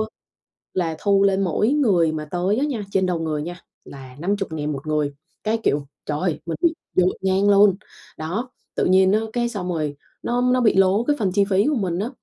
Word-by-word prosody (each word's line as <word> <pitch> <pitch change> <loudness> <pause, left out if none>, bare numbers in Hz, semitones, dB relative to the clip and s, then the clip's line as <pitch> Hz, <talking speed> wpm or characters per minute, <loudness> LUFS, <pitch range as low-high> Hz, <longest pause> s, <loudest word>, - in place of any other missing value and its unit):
á, 215 - 0 0.7
là 165 -3 -1
thu 200 -1 +3
lên 195 -1 +3
mỗi 195 +4 +1
người 200 - +3
mà 155 -1 -4
tới 180 +6 -1
á 275 - +1
nha, 250 -8 -3
trên 190 -1 +2
đầu 175 -2 -1
người 155 -2 -2
nha, 175 +2 -6 0.3
là 130 -2 -11
50.000 170 -5 -2
1 140 +2 -7
người. 150 -2 0 0.3
Cái, 220 +1 +1
kiểu, 145 0 +1 0.2
trời 150 0 -2
ơi, 175 -3 -1
mình 165 - -3
bị 340 -2 +3 0.2
dội 185 0 +2
ngang 190 +1 +2
luôn, 200 -1 +6 0.4
đó. 205 +11 -4 0.2
Tự - - +1
nhiên 190 +1 +5
á, 215 - +4
cái 240 -1 0
xong 195 -6 -4
rồi, 155 -4 -2 0.3
nó 245 +1 0
nó 250 0 +2
bị 220 -5 +3
lố 195 +3 +4
cái 295 +3 +1
phần 195 -4 +1
chi 200 +1 +4
phí 195 +1 +3
của 300 - +2
mình 185 -7 -1
á, 220 +5 -2
190 Hz, 220 wpm, -22 LUFS, 165-210 Hz, 0.7 s, luôn